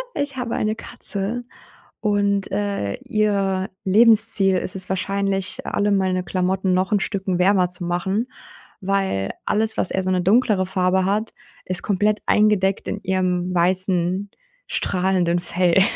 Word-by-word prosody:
ich 285 -2 -3
habe 245 -2 -3
eine 215 0 -1
Katze 220 +2 -3 0.6
und, 200 -2 0
äh, 200 - -2
ihr 195 -3 0
Lebensziel 215 -1 +5
ist 185 - -5
es 185 -1 -4
wahrscheinlich, 195 0 -2
alle 205 0 0
meine 185 -2 +1
Klamotten 185 +1 0
noch 185 +2 0
'n 205 - +3
Stücken 190 -2 -2
wärmer 185 0 +3
zu 180 0 -3
machen, 190 +6 -1 0.5
weil 190 - -1
alles, 220 +1 0
was - - 0
eher 190 - -1
so 185 - -1
'ne 185 -1 +1
dunklere 200 0 +2
Farbe 185 0 +1
hat, 210 +3 -1 0.3
ist 185 -1 -3
komplett 210 +1 +1
eingedeckt 205 -2 +2
in 205 - -4
ihrem 185 -1 -1
weißen 185 +2 +1 0.4
strahlenden 180 -2 0
Fell. 180 +1 +2
190 Hz, 140 wpm, -21 LUFS, 185-205 Hz, 0.6 s, Lebensziel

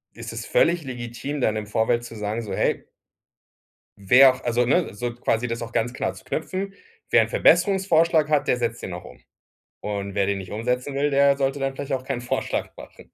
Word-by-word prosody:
ist - - -8
das - - -6
völlig 175 - +2
legitim, 125 +3 -5
dann 110 -3 +1
im 105 -1 -4
Vorfeld 120 +3 0
zu 115 -1 -9
sagen 105 +2 -3
so: 100 -3 -6
„Hey - - 0 1.1
wer 130 +7 +6
auch“ 130 - -12
also 120 0 +1
ne, 160 - +1
so 120 +2 -4
quasi 120 0 -1
das 115 0 -4
auch 115 0 -7
ganz 120 +1 0
klar - - -3
zu - - -14
knüpfen: 190 +6 -4 0.4
„Wer - - +6
'n - - -2
Verbesserungsvorschlag 175 - +3
hat, 150 -2 +1
der - - +3
setzt 120 0 -2
den 90 - -5
auch 90 - -8
um. 65 0 -13 0.6
Und 100 -1 -4
wer 100 -1 +1
den 100 -1 -1
nicht 95 -1 -9
umsetzen 125 +5 -2
will, 145 +1 +1
der 140 0 +4
sollte 135 0 -1
dann 135 -1 -2
vielleicht 140 0 -5
auch 130 -1 -2
keinen 130 -3 -3
Vorschlag 120 - -2
machen.“ - - -12
125 Hz, 210 wpm, -24 LUFS, 115-145 Hz, 1.1 s, wer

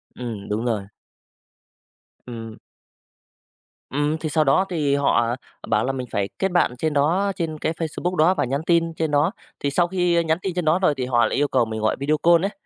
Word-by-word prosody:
Ừm, 115 -5 -6
đúng 110 +3 -1
rồi. 105 -5 -1 1.4
Ừm. 115 -2 -8 1.3
Ừm, 145 +3 0
thì 155 -1 -4
sau 155 +1 +2
đó 145 +7 +3
thì 150 -6 +1
họ 120 -4 +2 0.3
bảo - - +1
là 135 - 0
mình 130 -2 -5
phải 100 -1 -1
kết 190 -1 0
bạn 175 -8 +2
trên 155 +3 -1
đó 175 +8 +2
trên 165 -4 -3
cái 160 - -1
Facebook 170 +3 -3
đó 165 +3 +4
và - - 0
nhắn 140 +4 -2
tin 165 -1 +2
trên 160 -2 -2
đó. 145 +6 +3 0.3
Thì 140 - -1
sau 175 +4 +2
khi 175 -2 +1
nhắn 160 0 +1
tin 190 - -3
trên 180 - -1
đó 155 +4 +3
rồi 180 -6 +3
thì 125 - -1
họ 120 -2 +3
lại - - -1
yêu 145 - +2
cầu 130 -4 +2
mình 110 -1 -5
gọi 110 - +1
video 150 +2 +1
call 170 +1 +5
ấy, 200 - -1
150 Hz, 215 wpm, -23 LUFS, 125-170 Hz, 1.4 s, call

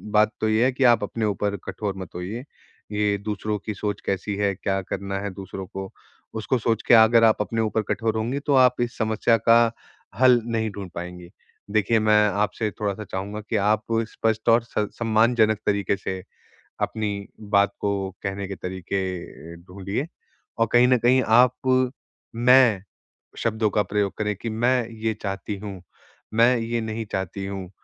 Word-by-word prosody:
बात 105 +1 +5
तो 110 - +2
ये 110 +2 +3
है 130 - +3
कि 130 +1 -1
आप 115 - -1
अपने 110 +2 -2
ऊपर 100 0 -1
कठोर 100 -3 -4
मत 95 -2 -9
होइए। 95 +8 -5 0.5
ये 105 -1 +1
दूसरों 105 +1 -3
की 110 - -3
सोच 105 0 -4
कैसी 100 +1 -2
है, 100 0 +1
क्या 95 0 -1
करना 100 +1 -4
है 100 +1 -3
दूसरों 95 0 -7
को 95 -1 -7 0.4
उसको 110 +4 -1
सोच 115 -1 0
के - - +6
अगर 115 0 +7
आप 110 -1 +5
अपने 115 +2 -1
ऊपर 110 0 0
कठोर 110 -1 -1
होंगी 120 +5 -1
तो 145 - +2
आप 125 -1 +4
इस 120 0 -2
समस्या 110 +1 +2
का 115 0 +6 0.5
हल 125 -2 +6
नहीं 115 -1 -1
ढूँढ 100 -2 -6
पाएँगी। 90 0 -7 0.4
देखिए, 110 +2 +2
मैं 105 0 +4
आपसे 105 +2 -1
थोड़ा-सा 105 0 -2
चाहूँगा 100 +2 -5
कि - - -1
आप 105 +1 +2 0.3
स्पष्ट 110 0 0
और 115 0 +5
स 105 -2 -2
सम्मानजनक 110 -1 +3
तरीके 100 -1 +1
से 95 -1 -5 0.6
अपनी 105 -2 -2
बात 100 -1 +2
को 100 - 0 0.3
कहने 100 0 -3
के 100 - -5
तरीके 95 +2 -4 0.5
अ, - - -10
ढूँढिए। 100 - -4 0.5
और 115 0 +2
कहीं 120 +1 +6
न 125 0 +4
कहीं 125 +2 +4
आप 125 +2 +3 0.4
मैं 120 -4 +5 0.6
शब्दों 110 -1 0
का 105 - +2
प्रयोग 100 0 -1
करें 105 -1 -1
कि 115 +4 -5
मैं 120 +2 +1
ये 110 0 -2
चाहती 100 +1 -4
हूँ, 100 -3 -8 0.5
मैं 120 +3 +5
ये 115 +1 -2
नहीं 110 0 -4
चाहती 95 +1 -3
हूँ, 95 -2 -6
110 Hz, 175 wpm, -24 LUFS, 100-115 Hz, 0.6 s, अगर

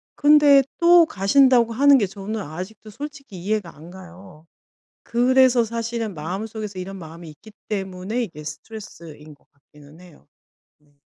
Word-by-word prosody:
근데 290 -1 +6 0.2
또 345 0 +6
가신다고 235 +3 +3
하는 280 +3 +5
게 220 - +1
저는 200 +3 -6
아직도 190 +6 -9
솔직히 275 -3 -9
이해가 205 -3 -3
안 160 +4 -14
가요. 180 -3 -14 0.6
그래서 250 0 +3
사실은 230 -1 -4
마음속에서 200 +5 -6
이런 195 +2 -7
마음이 165 -1 -11
있기 155 +8 -16 0.2
때문에 195 +3 -4
이게 160 -8 -9
스트레스인 155 -3 -11
것 145 - -27
같기는 145 +3 -19
해요. 175 - -19 0.5
네. 145 -1 -32
200 Hz, 320 characters per minute, -22 LUFS, 170-235 Hz, 0.6 s, 근데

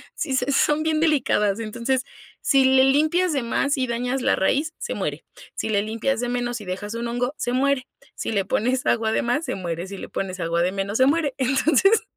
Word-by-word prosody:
si 270 - -3
se 260 +1 0
son 295 +2 +2
bien 315 -1 +1
delicadas, 235 -9 +2
entonces, 235 +4 -2 0.4
si 275 -2 +4
le 265 0 +5
limpias 310 +5 +2
de 275 - 0
más 280 +5 0
y 255 -1 0
dañas 245 +2 -2
la - - +2
raíz, 290 +11 +1
se 475 - -4
muere, - - -4 0.3
si - - -3
le 205 -2 +1
limpias 225 +4 -1
de 245 - -2
menos 245 -2 -2
y - - -9
dejas 195 +4 -5
un 235 0 -3
hongo, 245 +3 -1
se 245 - -2
muere, 260 0 +1 0.3
si - - -4
le 200 -3 0
pones 250 +6 0
agua 220 -1 +1
de - - 0
más, 245 +7 0
se 255 -5 -3
muere, 175 -1 -4
si 195 0 -8
le - - -7
pones 185 -1 -4
agua 170 0 0
de 180 +2 +1
menos, 200 +3 -2
se 260 - +6
muere, 295 -2 +1
entonces, 310 - +3
250 Hz, 220 wpm, -23 LUFS, 215-280 Hz, 0.4 s, se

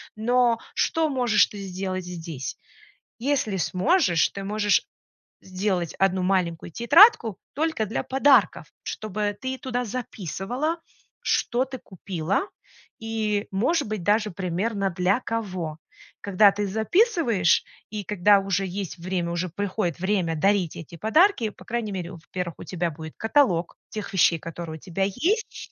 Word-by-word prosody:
Но 235 +1 +2 0.2
что 320 -2 +1
можешь 245 -6 +3
ты 205 - -11
сделать 185 -1 -4
здесь? 165 -6 -6 0.6
Если 250 -7 0
сможешь, 185 - +2
ты 195 - -7
можешь 210 0 +1 0.6
сделать 185 -2 -2
1 190 -1 +2
маленькую 175 -3 0
тетрадку 235 - +6 0.2
только 315 -7 0
для 210 - -3
подарков, 265 - +3 0.2
чтобы 210 -1 -3
ты 260 +2 -3
туда 250 -2 -2
записывала, 245 - -3 0.4
что 245 +2 +1
ты 265 0 -7
купила 185 - -3 0.5
и, 220 -2 -1
может 245 - +1
быть, 215 -2 -3
даже 210 +2 +2
примерно 195 +3 -1
для 185 +6 +1
кого. 185 -10 -4 0.4
Когда 200 +1 +5
ты 205 +1 -2
записываешь 230 - +2 0.3
и 210 -1 -4
когда 200 +1 +4
уже 195 0 -1
есть 185 -1 -5
время, 175 -1 -2
уже 175 +1 -2
приходит 185 -2 -2
время 185 -4 0
дарить 190 0 +1
эти 165 +1 -9
подарки, 235 - +3
по 185 - -16
крайней 230 -1 -2
мере, 180 -1 -4
во-первых, 175 0 -6
у - - -7
тебя 175 -2 -2
будет 160 +1 -9
каталог 220 - +2
тех 215 -1 -6
вещей, 170 -3 +4
которые 165 0 -7
у - - -16
тебя 185 +4 -3
есть, 340 - -2
200 Hz, 140 wpm, -25 LUFS, 180-230 Hz, 0.6 s, тетрадку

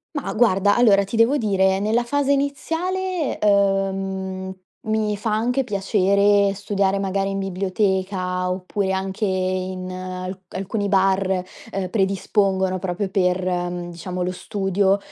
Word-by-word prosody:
Mah, 290 - -3
guarda, 205 -3 +3
allora 205 -5 +5
ti 200 - -5
devo 230 +6 +4
dire 190 -4 +2
nella 220 +4 +1
fase 280 +3 +1
iniziale, 325 +5 -2
uhm, 195 -2 0 0.3
mi 215 -1 0
fa 210 +1 -2
anche 245 +5 +1
piacere 200 -1 +2
studiare 200 -1 0
magari 195 0 -1
in 195 0 -2
biblioteca, 190 -1 -1
oppure 190 +1 -2
anche 190 +2 -3
in 185 -1 -1
alc 185 0 -6
alcuni 200 +2 -3
bar, 190 -1 +2 0.3
ehm, 190 -2 -3
predispongono 190 -1 +1
proprio 185 +2 -2
per, 185 -1 +1
mhmm, 175 -1 -2
diciamo 180 +2 -5
lo 180 +1 -1
studio, 195 +1 +1
195 Hz, 125 wpm, -22 LUFS, 185-210 Hz, 0.3 s, allora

